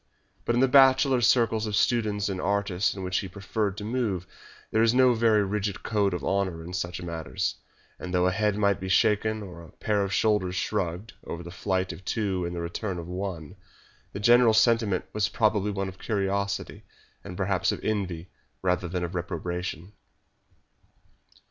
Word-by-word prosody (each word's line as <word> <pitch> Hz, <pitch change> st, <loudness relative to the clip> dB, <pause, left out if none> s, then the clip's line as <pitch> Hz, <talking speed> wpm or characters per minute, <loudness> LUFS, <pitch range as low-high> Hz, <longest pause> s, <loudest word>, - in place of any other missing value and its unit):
But 120 Hz, -, +1 dB
in 120 Hz, -, +3 dB
the 135 Hz, -, +5 dB
bachelor 135 Hz, -1 st, +5 dB
circles 115 Hz, -2 st, +3 dB
of 105 Hz, -, -1 dB
students 105 Hz, -4 st, +1 dB
and 95 Hz, -2 st, -3 dB
artists 100 Hz, -1 st, 0 dB
in 95 Hz, -, -6 dB
which 95 Hz, 0 st, 0 dB
he 95 Hz, -, -5 dB
preferred 100 Hz, +1 st, -3 dB
to 105 Hz, -, -6 dB
move 110 Hz, -6 st, -1 dB, 0.5 s
there 110 Hz, -, +2 dB
is 115 Hz, +1 st, +4 dB
no 130 Hz, -1 st, +6 dB
very 110 Hz, -2 st, +3 dB
rigid 100 Hz, 0 st, -2 dB
code 100 Hz, -4 st, +1 dB
of -, -, -5 dB
honour 95 Hz, -4 st, -1 dB
in 90 Hz, +2 st, -8 dB
such 90 Hz, -1 st, -3 dB
matters, 80 Hz, -7 st, -3 dB, 0.4 s
and 90 Hz, -, -6 dB
though 90 Hz, 0 st, +2 dB
a 95 Hz, -, +3 dB
head 105 Hz, +1 st, 0 dB
might 100 Hz, -1 st, +2 dB
be 95 Hz, 0 st, -5 dB
shaken 110 Hz, +1 st, +2 dB
or 90 Hz, -3 st, -10 dB
a 85 Hz, -, -13 dB
pair 105 Hz, -2 st, 0 dB
of 100 Hz, -, -3 dB
shoulders 95 Hz, -3 st, +1 dB
shrugged 95 Hz, +1 st, -2 dB
over 85 Hz, +1 st, -6 dB
the 85 Hz, -, -9 dB
flight 95 Hz, 0 st, -1 dB
of 95 Hz, -, -12 dB
two 95 Hz, -4 st, -1 dB
and 85 Hz, -, -5 dB
the 85 Hz, -, -3 dB
return 90 Hz, +3 st, -4 dB
of 85 Hz, -1 st, -6 dB
one, 90 Hz, -2 st, -5 dB, 0.6 s
the 100 Hz, -, -6 dB
general 120 Hz, +1 st, +5 dB
sentiment 110 Hz, -5 st, +3 dB
was 105 Hz, -2 st, +1 dB
probably 105 Hz, -2 st, +1 dB
one 100 Hz, -1 st, -2 dB
of 95 Hz, 0 st, -9 dB
curiosity 100 Hz, -1 st, -2 dB, 0.4 s
and 90 Hz, -, -8 dB
perhaps 95 Hz, -1 st, +1 dB
of -, -, -4 dB
envy 95 Hz, -5 st, -2 dB, 0.3 s
rather 90 Hz, -1 st, +1 dB
than 90 Hz, +1 st, -3 dB
of 85 Hz, +1 st, -4 dB
reprobation. 90 Hz, +1 st, -4 dB
100 Hz, 180 wpm, -27 LUFS, 90-110 Hz, 0.6 s, no